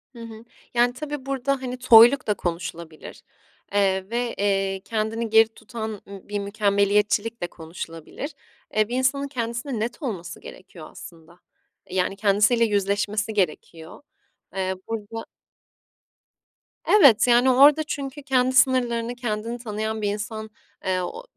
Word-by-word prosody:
Hı -, -, -11 dB
hı. 225 Hz, 0 st, -11 dB, 0.3 s
Yani 245 Hz, +1 st, +3 dB
tabii 290 Hz, 0 st, -6 dB
burada 275 Hz, 0 st, -1 dB
hani 250 Hz, 0 st, -5 dB
toyluk 240 Hz, +1 st, +7 dB
da 210 Hz, -, +3 dB
konuşulabilir, 170 Hz, -3 st, -6 dB, 0.5 s
eee, 190 Hz, -1 st, +1 dB
ve, 240 Hz, 0 st, -2 dB
eee, 195 Hz, -1 st, 0 dB
kendini 225 Hz, +1 st, -2 dB
geri 225 Hz, 0 st, +6 dB
tutan 220 Hz, 0 st, -7 dB, 0.2 s
ı 200 Hz, 0 st, -12 dB
bir 205 Hz, -1 st, -2 dB
mükemmeliyetçilik 205 Hz, +2 st, +1 dB
de 175 Hz, -, -1 dB
konuşulabilir. 165 Hz, -, -8 dB, 0.4 s
Eee, 215 Hz, -1 st, +2 dB
bir 245 Hz, -, -3 dB
insanın 275 Hz, +2 st, +1 dB
kendisine 235 Hz, -1 st, -4 dB
net 240 Hz, +7 st, -4 dB
olması 200 Hz, -, -5 dB
gerekiyor 170 Hz, -4 st, -12 dB
aslında, 170 Hz, +1 st, -13 dB, 0.5 s
eee, 185 Hz, -, -7 dB
yani 185 Hz, +1 st, 0 dB
kendisiyle 210 Hz, +3 st, +3 dB
yüzleşmesi 205 Hz, +1 st, -1 dB
gerekiyor. 165 Hz, -, -3 dB, 0.5 s
Eee, 190 Hz, 0 st, -1 dB
burada 225 Hz, 0 st, -5 dB, 1.6 s
Evet, 275 Hz, -, +6 dB
yani 245 Hz, +2 st, +5 dB
orada 290 Hz, +4 st, +6 dB
çünkü 280 Hz, -1 st, -6 dB
kendi 260 Hz, -2 st, +1 dB
sınırlarını, 245 Hz, -2 st, +2 dB
kendini 230 Hz, -1 st, -3 dB
tanıyan 220 Hz, -1 st, -4 dB
bir 205 Hz, -, 0 dB
insan, 215 Hz, +1 st, -6 dB, 0.4 s
eee, 185 Hz, -1 st, 0 dB
o 470 Hz, -, -6 dB
220 Hz, 130 wpm, -24 LUFS, 200-245 Hz, 1.6 s, toyluk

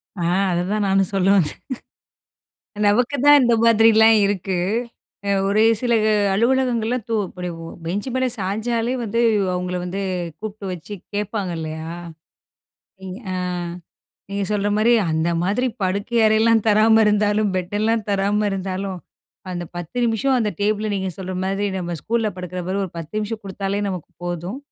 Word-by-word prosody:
ஆ, 180 Hz, -, -5 dB, 0.3 s
அதைதான் 195 Hz, +4 st, 0 dB
நானும் 195 Hz, 0 st, +2 dB
சொல்ல 190 Hz, -1 st, +1 dB
வந்தேன். 160 Hz, -5 st, 0 dB, 1.3 s
நமக்கு 245 Hz, +7 st, +2 dB
தான் 290 Hz, 0 st, +9 dB
இந்த 240 Hz, -1 st, +4 dB
மாதிரிலாம் 225 Hz, -1 st, +6 dB
இருக்கு. 195 Hz, -1 st, -1 dB, 0.7 s
அ -, -, +1 dB, 0.2 s
ஒரு 215 Hz, +2 st, +3 dB, 0.2 s
சில 240 Hz, -2 st, +1 dB, 0.4 s
அலுவலகங்கள்லாம் 245 Hz, 0 st, +1 dB
து 225 Hz, -, 0 dB
இப்படி 180 Hz, 0 st, -6 dB, 0.2 s
ஒ -, -, -7 dB, 0.2 s
பெஞ்ச் 200 Hz, +7 st, -2 dB
மேல 260 Hz, 0 st, +1 dB
சாஞ்சாலே 225 Hz, +5 st, -1 dB
வந்து 230 Hz, +1 st, -1 dB, 0.3 s
அவுங்கள 180 Hz, 0 st, -2 dB
வந்து 185 Hz, +2 st, -4 dB, 0.4 s
கூப்பிட்டு 215 Hz, -1 st, -7 dB
வச்சு 180 Hz, +4 st, -7 dB, 0.2 s
கேப்பாங்க 205 Hz, -2 st, -2 dB
இல்லையா! 160 Hz, 0 st, -5 dB, 1.2 s
இங் 185 Hz, -1 st, -6 dB, 0.2 s
அ -, -, -2 dB, 0.9 s
நீங்க 200 Hz, 0 st, -2 dB
சொல்ற 205 Hz, -1 st, 0 dB
மாரி 220 Hz, +3 st, +4 dB, 0.2 s
அந்த 160 Hz, +2 st, +1 dB
மாதிரி 210 Hz, +8 st, +1 dB, 0.2 s
படுக்கை 200 Hz, +6 st, -1 dB
அறையெல்லாம் 220 Hz, 0 st, +4 dB
தராம 220 Hz, +1 st, +5 dB
இருந்தாலும், 210 Hz, 0 st, +2 dB
பெட் 185 Hz, +1 st, -3 dB
எல்லாம் 225 Hz, 0 st, +1 dB
தராம 200 Hz, +1 st, +1 dB
இருந்தாலும். 190 Hz, -1 st, -3 dB, 0.5 s
அந்த 175 Hz, -1 st, -4 dB
10 175 Hz, +6 st, -6 dB
நிமிஷம் 235 Hz, +4 st, +1 dB
அந்த 215 Hz, -3 st, +1 dB
டேபிள்ல 215 Hz, +1 st, 0 dB
நீங்க 190 Hz, -1 st, -2 dB
சொல்ற 185 Hz, -1 st, -5 dB
மாதிரி 195 Hz, +1 st, -1 dB
நம்ம 175 Hz, -2 st, -3 dB
ஸ்கூல்ல 225 Hz, -1 st, 0 dB
படுக்கிற 180 Hz, 0 st, -5 dB
மாதிரி 195 Hz, +2 st, -1 dB
ஒரு 180 Hz, -, -11 dB
10 165 Hz, +2 st, -7 dB
நிமிஷம் 215 Hz, +1 st, -4 dB
குடுத்தாலே 195 Hz, +1 st, -3 dB
நமக்கு 180 Hz, -4 st, -6 dB
போதும். 175 Hz, +6 st, -4 dB
205 Hz, 145 wpm, -21 LUFS, 185-225 Hz, 1.3 s, தான்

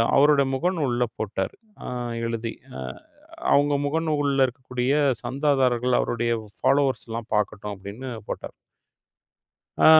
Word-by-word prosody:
அவரோட 145 Hz, 0 st, +6 dB
முகநூல்ல 140 Hz, -5 st, +1 dB
போட்டாரு, 95 Hz, -3 st, -2 dB, 0.3 s
அ -, -, -5 dB, 0.4 s
எழுதி. 115 Hz, 0 st, -2 dB, 0.3 s
அ, -, -, -6 dB, 0.7 s
அவங்க 145 Hz, +1 st, +4 dB
முகநூல்ல 145 Hz, -3 st, +2 dB
இருக்கக்கூடிய 125 Hz, 0 st, -2 dB, 0.3 s
சந்தாதாரர்கள் 130 Hz, -3 st, +2 dB
அவரோட 120 Hz, -, -1 dB, 0.4 s
ஃபாலோவர்ஸ் 140 Hz, -3 st, +2 dB
எல்லாம் 115 Hz, 0 st, -5 dB
பார்க்கட்டும் 105 Hz, 0 st, -1 dB
அப்படின்னு 100 Hz, +7 st, -7 dB, 0.2 s
போட்டாரு. -, -, -5 dB, 1.3 s
ஆ -, -, +7 dB
130 Hz, 100 wpm, -25 LUFS, 115-145 Hz, 1.3 s, ஆ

